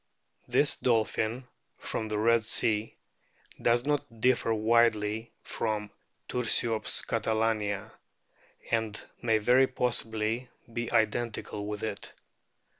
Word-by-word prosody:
This 145 Hz, -, +2 dB
dolphin, 115 Hz, +1 st, 0 dB, 0.3 s
from 110 Hz, -, -3 dB
the 105 Hz, -1 st, -2 dB
Red 115 Hz, +1 st, +4 dB
Sea, 110 Hz, 0 st, 0 dB, 0.7 s
does 120 Hz, +1 st, +3 dB
not 140 Hz, -6 st, -1 dB
differ 125 Hz, -1 st, +3 dB
widely 110 Hz, 0 st, +2 dB
from 105 Hz, -2 st, -2 dB, 0.4 s
Tiirsiops 115 Hz, -2 st, 0 dB
catalania, 110 Hz, -2 st, 0 dB, 0.8 s
and 110 Hz, -2 st, 0 dB, 0.2 s
may 115 Hz, -2 st, +3 dB
very 125 Hz, +5 st, +5 dB
possibly 115 Hz, -1 st, -1 dB, 0.2 s
be 120 Hz, 0 st, -3 dB
identical 110 Hz, -2 st, 0 dB
with 105 Hz, -1 st, -4 dB
it. 105 Hz, -2 st, -5 dB
110 Hz, 100 wpm, -29 LUFS, 110-120 Hz, 0.8 s, very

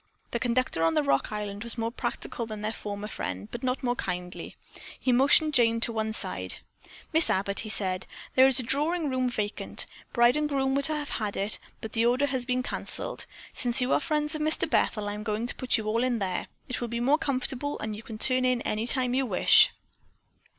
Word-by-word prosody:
The 235 Hz, -, -2 dB
conductor 245 Hz, -7 st, 0 dB
on 165 Hz, 0 st, +2 dB
the 150 Hz, -, +2 dB
Rock 140 Hz, +5 st, 0 dB
Island 210 Hz, 0 st, -5 dB
was 235 Hz, +1 st, -2 dB
more 230 Hz, 0 st, -2 dB
practical 240 Hz, -1 st, -4 dB
than 215 Hz, -1 st, -7 dB
their 215 Hz, -, -1 dB
former 205 Hz, -1 st, -6 dB
friend, 95 Hz, -, -5 dB
but -, -, -6 dB
not 255 Hz, +1 st, -2 dB
more 245 Hz, -1 st, 0 dB
kindly. 180 Hz, -4 st, -5 dB, 0.4 s
He 255 Hz, -, 0 dB
motioned 285 Hz, +5 st, +4 dB
Jane 230 Hz, -3 st, +3 dB
to 230 Hz, -, +1 dB
one 220 Hz, -1 st, -2 dB
side. 220 Hz, -, 0 dB, 0.6 s
"Miss 320 Hz, +1 st, +7 dB
Abbott," 200 Hz, +1 st, 0 dB
he 215 Hz, -, -3 dB
said, 185 Hz, -3 st, -1 dB, 0.3 s
"there 260 Hz, 0 st, +6 dB
is 265 Hz, -1 st, +3 dB
a -, -, -1 dB
drawing 295 Hz, +5 st, 0 dB
room 255 Hz, -1 st, 0 dB
vacant. 210 Hz, -3 st, -1 dB, 0.3 s
Bride 240 Hz, 0 st, +4 dB
and 300 Hz, 0 st, -1 dB
groom 270 Hz, -2 st, 0 dB
were 280 Hz, -, +1 dB
to 310 Hz, +1 st, -1 dB
have 295 Hz, -1 st, -3 dB
had 210 Hz, -3 st, -1 dB
it, 200 Hz, +2 st, +1 dB, 0.2 s
but 220 Hz, -, -6 dB
the 230 Hz, +1 st, +2 dB
order 255 Hz, +4 st, +2 dB
has 260 Hz, -3 st, 0 dB
been 250 Hz, 0 st, 0 dB
canceled. -, -, -6 dB, 0.3 s
Since 245 Hz, +1 st, +7 dB
you 250 Hz, +1 st, +1 dB
are -, -, +3 dB
friends 300 Hz, 0 st, -1 dB
of 310 Hz, -, -2 dB
Mr. 310 Hz, +1 st, +1 dB
Bethel, 210 Hz, -1 st, 0 dB
I'm 205 Hz, +1 st, -4 dB
going 215 Hz, +1 st, -2 dB
to 245 Hz, -, +2 dB
put 255 Hz, -, +2 dB
you 220 Hz, -, -5 dB
all 225 Hz, +3 st, 0 dB
in 250 Hz, -2 st, 0 dB
there. 190 Hz, -4 st, -3 dB, 0.2 s
It 250 Hz, -, -4 dB
will 240 Hz, -, -2 dB
be 235 Hz, 0 st, -4 dB
more 275 Hz, +6 st, +2 dB
comfortable, 275 Hz, +1 st, -2 dB
and 215 Hz, -1 st, -4 dB
you 215 Hz, -, -8 dB
can 220 Hz, -1 st, -9 dB
turn 255 Hz, +3 st, +3 dB
in 255 Hz, -1 st, +1 dB
any 215 Hz, +2 st, -2 dB
time 250 Hz, -1 st, +2 dB
you 265 Hz, 0 st, 0 dB
wish." -, -, +5 dB
240 Hz, 220 wpm, -27 LUFS, 215-265 Hz, 0.6 s, Miss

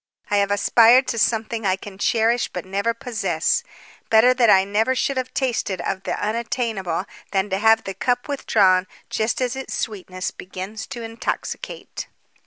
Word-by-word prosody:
I 205 Hz, -, +3 dB
have 200 Hz, 0 st, +2 dB
aspired 230 Hz, +5 st, +5 dB
to 230 Hz, -, -1 dB
something 225 Hz, 0 st, 0 dB
I 190 Hz, -2 st, +2 dB
can 195 Hz, 0 st, -11 dB
cherish 230 Hz, +3 st, +2 dB
but 180 Hz, -, -6 dB
never 200 Hz, +4 st, 0 dB
possess. 230 Hz, 0 st, -1 dB, 0.5 s
Better 225 Hz, +3 st, +6 dB
that 245 Hz, -3 st, +3 dB
I 190 Hz, -2 st, +6 dB
never 215 Hz, +6 st, +1 dB
should 275 Hz, +2 st, 0 dB
have 255 Hz, -1 st, -3 dB
tasted 235 Hz, -8 st, -1 dB
of 190 Hz, +2 st, -3 dB
the -, -, -2 dB
unattainable 215 Hz, -5 st, -2 dB, 0.2 s
than 195 Hz, 0 st, -1 dB
to 190 Hz, -, 0 dB
have 225 Hz, +1 st, +4 dB
the 195 Hz, -, -5 dB
cup 245 Hz, +4 st, -1 dB
withdrawn 190 Hz, -9 st, +3 dB, 0.2 s
just 220 Hz, +3 st, 0 dB
as 250 Hz, 0 st, -1 dB
its 265 Hz, 0 st, -5 dB
sweetness 185 Hz, -3 st, -4 dB
begins 190 Hz, +4 st, -7 dB
to 240 Hz, -4 st, -7 dB
intoxicate." 230 Hz, -, -5 dB
220 Hz, 165 wpm, -22 LUFS, 195-235 Hz, 0.5 s, Better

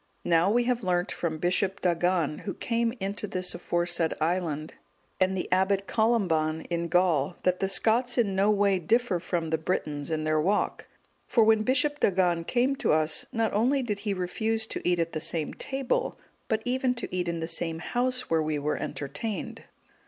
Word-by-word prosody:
Now 170 Hz, +2 st, +3 dB
we 240 Hz, +3 st, +3 dB
have 245 Hz, -1 st, 0 dB
learnt 180 Hz, -1 st, 0 dB
from 160 Hz, -2 st, -3 dB
Bishop 185 Hz, +3 st, 0 dB
Dagan,(185) 175 Hz, -3 st, +1 dB
who 195 Hz, -, -1 dB
came 230 Hz, -1 st, 0 dB
into 200 Hz, +2 st, -3 dB
this 185 Hz, -1 st, -1 dB
aforesaid 175 Hz, -1 st, -1 dB
island, 160 Hz, -2 st, -1 dB, 0.5 s
and 190 Hz, 0 st, +2 dB
the 180 Hz, -, -2 dB
Abbot 190 Hz, +2 st, +2 dB
Columban,(186) 175 Hz, -10 st, +1 dB
in 170 Hz, 0 st, -1 dB
Gaul, 170 Hz, -3 st, +2 dB
that 180 Hz, 0 st, +1 dB
the 195 Hz, -, +1 dB
Scots 235 Hz, +6 st, +2 dB
in 205 Hz, -5 st, +2 dB
no 195 Hz, +2 st, +3 dB
way 200 Hz, -2 st, +3 dB
differ 220 Hz, +1 st, +1 dB
from 170 Hz, -2 st, -2 dB
the 160 Hz, -, +1 dB
Britons 150 Hz, -3 st, -2 dB
in 155 Hz, -1 st, -1 dB
their 155 Hz, 0 st, +1 dB
walk; 200 Hz, +6 st, 0 dB, 0.4 s
for 230 Hz, -, +4 dB
when 220 Hz, 0 st, +4 dB
Bishop 270 Hz, +5 st, +1 dB
Dagan 175 Hz, -3 st, +2 dB
came 255 Hz, +2 st, +2 dB
to -, -, +1 dB
us, 155 Hz, 0 st, +2 dB
not 225 Hz, -1 st, 0 dB
only 255 Hz, +6 st, +2 dB
did 210 Hz, -4 st, -2 dB
he 205 Hz, -1 st, -2 dB
refuse 220 Hz, +5 st, -1 dB
to -, -, -5 dB
eat 175 Hz, 0 st, +2 dB
at 165 Hz, 0 st, -1 dB
the 155 Hz, -, -4 dB
same 160 Hz, -1 st, -2 dB
table, 275 Hz, -, -2 dB, 0.3 s
but 220 Hz, 0 st, -1 dB
even 255 Hz, 0 st, +1 dB
to 235 Hz, -6 st, -5 dB
eat 180 Hz, -1 st, -1 dB
in 170 Hz, -1 st, -2 dB
the 165 Hz, -, -3 dB
same 165 Hz, -1 st, -2 dB
house 250 Hz, +7 st, -1 dB
where 165 Hz, -1 st, +2 dB
we 155 Hz, -1 st, -1 dB
were 145 Hz, +1 st, -1 dB
entertained." 195 Hz, +10 st, -5 dB
185 Hz, 185 wpm, -27 LUFS, 165-220 Hz, 0.5 s, for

